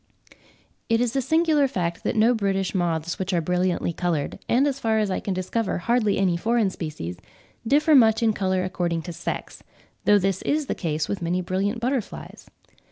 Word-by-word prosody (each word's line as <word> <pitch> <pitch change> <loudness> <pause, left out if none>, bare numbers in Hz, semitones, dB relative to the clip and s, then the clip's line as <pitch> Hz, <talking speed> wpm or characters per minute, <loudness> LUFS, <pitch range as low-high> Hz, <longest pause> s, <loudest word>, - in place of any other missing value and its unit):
It 230 0 +3
is 245 +1 0
a 270 - +2
singular 315 0 +3
fact 170 -8 -3
that - - -1
no 225 +3 +4
British 195 -4 -1
moths 170 -2 -1
which 190 0 -2
are 175 - +3
brilliantly 180 +1 0
coloured, 165 -5 -2
and, 255 +4 +4
as 275 -2 -1
far 225 -3 +1
as 210 -3 +1
I - - -1
can 195 - -3
discover, 195 +4 -1
hardly 215 +2 +1
any 185 -3 +2
foreign 225 +1 +1
species, 150 - -6 0.5
differ 300 +5 +4
much 225 -4 +5
in 220 -1 +3
colour 185 -2 0
according 175 -3 -2
to 175 - -6
sex; 170 +1 -5 0.4
though 205 - +6
this 195 -1 0
is 300 0 0
the - - -2
case 155 -2 -2
with 200 - -3
many 175 +2 0
brilliant 195 +5 -1
butterflies. 250 -2 -4
195 Hz, 185 wpm, -24 LUFS, 175-230 Hz, 0.5 s, though